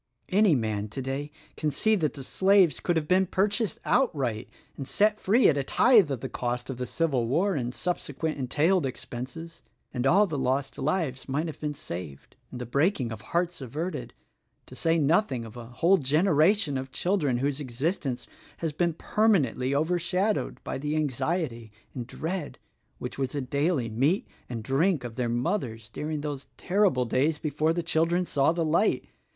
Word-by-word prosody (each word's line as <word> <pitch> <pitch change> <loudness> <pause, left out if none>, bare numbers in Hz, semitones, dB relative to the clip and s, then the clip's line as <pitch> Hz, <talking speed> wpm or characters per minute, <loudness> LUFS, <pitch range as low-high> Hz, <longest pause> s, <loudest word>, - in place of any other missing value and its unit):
Any 200 -4 +4
man, 110 -4 -1
todav, 135 +5 -4 0.3
can 155 - -1
see 220 +10 +2
that 160 -9 0
the 140 - -7
slaves 190 -1 +3
could 175 - 0
have 155 -2 0
been 185 +2 +3
purchased 200 +1 0
outright 135 - +1 0.3
and 135 - -6
set 210 +1 +2
free 230 +6 +4
at 145 -3 +3
a - - 0
tithe 215 - +5
of 135 -4 -3
the - - -3
cost 125 +1 -3
of 130 - -6
the 125 0 -3
civil 135 -6 0
war 180 - +2
and 125 -6 -2
sub 175 +7 -1
sequent 155 +1 -4
entailed 150 +5 +2
expenses, 130 +7 -7 0.3
and 125 0 0
all 200 +8 +5
the 155 -7 -3
lost 135 +2 -1
lives 140 -3 -1
might 145 +5 0
have 160 - -6
been 150 -1 -3
saved 85 - -8
and 125 - -8
the 125 - -4
breaking 140 - +1
of 110 -1 -6
hearts 170 +7 -1
averted— 155 +8 -5 0.5
to - - -13
say 165 0 +1
nothing 150 - +2
of 110 - -11
a 120 -1 -8
whole 170 +11 +3
generation 155 +2 +3
of 130 0 -7
children 160 -9 +1
whose 140 +2 -1
existence 135 -1 -2 0.3
has 165 -3 -3
been 170 +2 +1
permanently 150 - +1
overshadowed 180 +6 0
bv 135 - -4
the 150 +1 -1
anxiety 135 - -1 0.2
and 120 -3 -5
dread 165 +2 -4 0.4
which - - -6
was 135 -1 -1
the 145 - -1
daily 140 0 0
meat 135 - +1 0.2
and 115 -3 -5
drink 145 - +1
of 120 -2 -6
their 120 0 -1
mothers 120 - -2
during 150 +4 -4
those 145 -2 -5
terrible 185 -10 +2
days 145 +6 +1
before 155 +1 0
the 170 +1 -1
children 165 +2 +1
saw 140 -2 +2
the 165 -1 -1
light. 165 +7 +2
150 Hz, 175 wpm, -27 LUFS, 130-175 Hz, 0.5 s, tithe